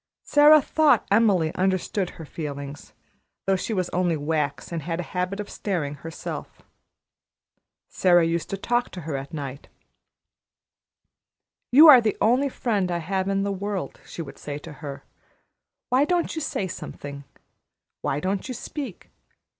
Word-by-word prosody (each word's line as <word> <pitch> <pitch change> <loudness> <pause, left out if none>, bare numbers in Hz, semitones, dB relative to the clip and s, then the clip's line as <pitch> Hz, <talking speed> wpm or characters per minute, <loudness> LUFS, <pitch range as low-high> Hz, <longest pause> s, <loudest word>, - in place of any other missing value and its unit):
Sara 295 0 +6
thought 310 -1 +3
Emily 200 -7 +3
understood 190 0 0
her 160 - -8
feelings, 145 -2 -7 0.5
though 195 - +3
she 190 - -3
was 185 -4 0
only 175 -2 +1
wax 150 0 -2
and 165 -2 -3
had 165 +3 -3
a - - -1
habit 180 +2 -2
of 210 - -4
staring 170 -8 -3
herself. 160 +3 -7 1.2
Sara 175 -2 +4
used 165 0 -1
to 195 - -3
talk 240 +4 0
to 180 - -6
her 155 -2 -4
at 135 0 -5
night. 140 -3 -6 2.0
"You 300 +6 +9
are 265 -5 +10
the 220 -2 0
only 255 +5 +3
friend 210 -8 -1
I 175 - 0
have 190 +3 -2
in 195 0 +1
the 200 - -1
world," 200 0 -4
she 165 - -7
would 140 - -11
say 145 -1 -5
to 150 +1 -10
her. 140 0 -8 0.9
"Why 255 +3 +4
don't 350 +2 0
you 320 - -3
say 205 -9 -2
something? 140 -4 -8 0.8
Why 135 - -1
don't 190 +3 -2
you 255 - -5
speak? 265 - -7
185 Hz, 155 wpm, -25 LUFS, 155-215 Hz, 2.0 s, are